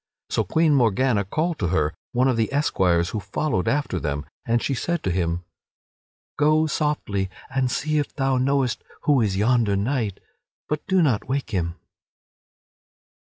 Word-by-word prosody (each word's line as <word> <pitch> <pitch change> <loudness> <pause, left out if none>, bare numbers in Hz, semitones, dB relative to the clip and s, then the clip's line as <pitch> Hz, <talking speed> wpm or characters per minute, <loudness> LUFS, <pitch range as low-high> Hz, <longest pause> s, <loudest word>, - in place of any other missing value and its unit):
So - - +2
Queen 160 -1 +2
Morgana 120 -3 +3
called 160 - -1
to 90 - 0
her 80 -3 +1 0.2
one 125 +2 +2
of 130 - +2
the 115 -1 0
esquires 90 - +2
who 110 - -3
followed 100 - -1
after 145 -10 0
them, 75 0 -3 0.2
and 115 +1 +3
she 135 - -1
said 170 +6 -2
to 95 - 0
him: 85 0 -1 1.0
"Go 155 +1 +4
softly 150 -12 -1 0.2
and 130 -1 +1
see 155 +4 0
if 145 - -2
thou 135 -2 +1
knowest 135 -2 +1 0.2
who 145 -4 +3
is 100 -4 0
yonder 110 -1 +3
knight; 110 -1 -1 0.5
but 150 0 -2
do 190 -2 +3
not 125 -6 +1
wake 135 -4 -2
him." 85 -4 -1
125 Hz, 160 wpm, -24 LUFS, 95-145 Hz, 1.0 s, Go